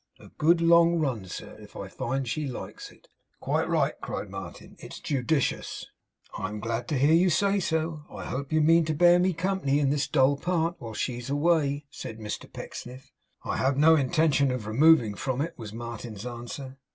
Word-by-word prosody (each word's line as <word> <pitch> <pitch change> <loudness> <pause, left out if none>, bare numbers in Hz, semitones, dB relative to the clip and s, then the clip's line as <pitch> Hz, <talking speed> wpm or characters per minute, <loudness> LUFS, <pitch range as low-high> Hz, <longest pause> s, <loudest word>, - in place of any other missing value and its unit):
A - - -14
good 165 +2 +2
long 170 0 +5
run, 130 - -1
sir, 90 - -8
if - - -14
I - - -6
find 135 +1 -3
she 150 +4 -2
likes 125 - -7
it.' - - -22 0.3
'Quite - - -1
right,' - - 0
cried - - -5
Martin. - - -9
'It's - - -9
judicious.' 140 +1 -1 0.5
'I - - -3
am 105 0 -6
glad 115 +2 -3
to 150 - -1
hear 145 +4 +4
you 180 +3 +5
say 200 +4 +2
so. 160 -3 -1
I - - -8
hope 140 +3 -4
you 155 0 +3
mean 165 +2 +5
to 155 0 -1
bear 175 +2 +6
me 185 +1 +3
company 170 -5 0
in 140 -2 +2
this 140 -1 0
dull 140 -1 +3
part, 170 +1 0
while 115 -2 -7
she's 120 +3 -3
away?' 145 -1 +1
said 110 - -7
Mr 105 -1 -6
Pecksniff. 125 +2 -9 0.3
'I - - -2
have 135 +1 +1
no 160 +3 +6
intention 145 -1 +2
of 125 -4 -3
removing 120 0 +4
from 130 +5 -3
it,' 160 +4 -2
was 110 -3 -8
Martin's 115 -1 -7
answer. 125 +3 -7
140 Hz, 190 wpm, -27 LUFS, 125-160 Hz, 0.5 s, bear